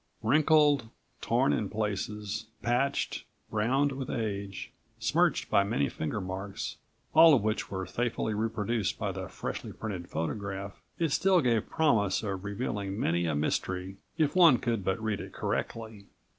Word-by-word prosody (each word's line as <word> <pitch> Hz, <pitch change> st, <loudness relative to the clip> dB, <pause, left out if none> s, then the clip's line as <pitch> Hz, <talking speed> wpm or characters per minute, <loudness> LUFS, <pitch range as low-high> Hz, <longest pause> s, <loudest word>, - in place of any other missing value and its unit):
Wrinkled, 145 Hz, 0 st, +4 dB, 0.3 s
torn 75 Hz, -, +2 dB
in 100 Hz, +7 st, -1 dB
places, 105 Hz, 0 st, -3 dB, 0.2 s
patched, 125 Hz, +4 st, 0 dB, 0.3 s
browned 130 Hz, +7 st, +2 dB
with 135 Hz, -1 st, -5 dB
age, 100 Hz, -4 st, -3 dB, 0.3 s
smirched -, -, +2 dB
by 100 Hz, -, +5 dB
many 70 Hz, -8 st, 0 dB
finger 80 Hz, +7 st, -3 dB
marks, 95 Hz, +1 st, -5 dB, 0.4 s
all 160 Hz, -1 st, +8 dB
of 115 Hz, -, +1 dB
which 110 Hz, 0 st, -1 dB
were 95 Hz, -1 st, -3 dB
faithfully 120 Hz, -1 st, -1 dB
reproduced 110 Hz, -1 st, -1 dB
by -, -, -2 dB
the -, -, -5 dB
freshly -, -, -5 dB
printed 95 Hz, -6 st, -6 dB
photograph, 100 Hz, +4 st, -4 dB, 0.2 s
it 165 Hz, -2 st, +1 dB
still 185 Hz, +4 st, +4 dB
gave 120 Hz, -7 st, +1 dB
promise 115 Hz, -, +2 dB
of 95 Hz, -3 st, -3 dB
revealing 100 Hz, -1 st, -3 dB
many 85 Hz, -2 st, +1 dB
a 80 Hz, -, 0 dB
mystery 90 Hz, +5 st, -2 dB, 0.2 s
if 155 Hz, -1 st, +1 dB
one 170 Hz, -8 st, +7 dB
could 115 Hz, -3 st, -1 dB
but 95 Hz, 0 st, 0 dB
read 110 Hz, -2 st, -2 dB
it -, -, -9 dB
correctly. 110 Hz, -3 st, -4 dB
105 Hz, 145 wpm, -29 LUFS, 95-125 Hz, 0.4 s, all